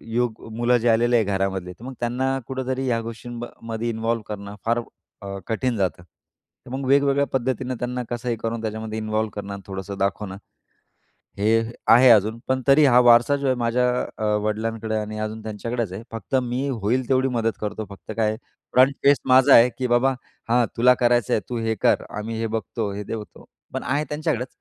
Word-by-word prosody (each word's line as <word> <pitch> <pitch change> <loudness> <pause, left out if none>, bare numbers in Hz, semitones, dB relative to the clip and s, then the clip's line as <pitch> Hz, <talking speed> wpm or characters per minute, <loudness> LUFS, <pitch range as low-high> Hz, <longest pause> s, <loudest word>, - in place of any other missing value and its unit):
युवक 115 0 -2 0.2
मुलं 120 +1 +3
जे 120 +1 0
आलेले 120 +1 +3
आहे 115 - +3
घरामध्ये, 95 -2 -2
तर 100 +6 -14
मग 130 - -6
त्यांना 130 +3 0
कुठेतरी 130 0 -3
ह्या 115 -2 +1
गोष्टींमध्ये 115 0 -6
इन्व्हॉल्व्ह 115 0 -2
करणं 100 -1 -6
फार 120 +1 +2 0.4
अ, 100 0 -5
कठीण 120 +2 -1
जातं. 95 -3 -1 0.6
तर - - -11
मग 130 +1 -4
वेगवेगळ्या 140 +1 +3
पद्धतीनं 130 0 -1
त्यांना 125 0 -3
कसंही 120 -1 -2
करून 115 0 -2
त्याच्यामध्ये 110 0 -4
इन्व्हॉल्व्ह 110 0 -1
करणं, 100 -1 -6
थोडंसं 95 0 -6
दाखवणं, 100 0 -2 1.0
हे 110 +3 +3 0.3
आहे 125 +2 +7
अजून, 110 +1 +3
पण 130 0 +1
तरी 145 +2 +6
हा 125 -2 +6
वारसा 120 +3 +6
जो 140 - -4
आहे 130 - +2
माझ्या 120 +1 +1 0.3
अ, 110 - -2 0.2
वडिलांकडे 110 +1 -2
आणि 110 0 -4
अजून 110 +1 -4
त्यांच्याकडेच 110 0 -3
आहे. 110 - -7
फक्त 115 +3 -4
मी 125 +3 -2
होईल 120 +1 -1
तेवढी 130 0 +3
मदत 115 0 -1
करतो. 105 +1 -3
फक्त 100 - -10
काय 110 - +2
आहे? 110 - -3 0.4
फ्रंट 130 +2 +5
फेस 140 0 +6
माझा 130 +2 +6
आहे, 120 +2 +7
की 130 -1 -1
"बाबा, 120 +3 +3 0.4
हा 120 0 +4
तुला 125 +2 +6
करायचंय, 120 -3 +2
तू 120 - -2
हे 110 0 -1
कर. - - +3
आम्ही 110 +1 -4
हे 115 - -1
बघतो, 110 -1 -4
हे 105 - -5
देतो", 105 +1 -8 0.3
पण - - -3
आहे 145 +3 0
त्यांच्याकडेच. 150 -4 -1
115 Hz, 185 wpm, -23 LUFS, 110-125 Hz, 1.0 s, आहे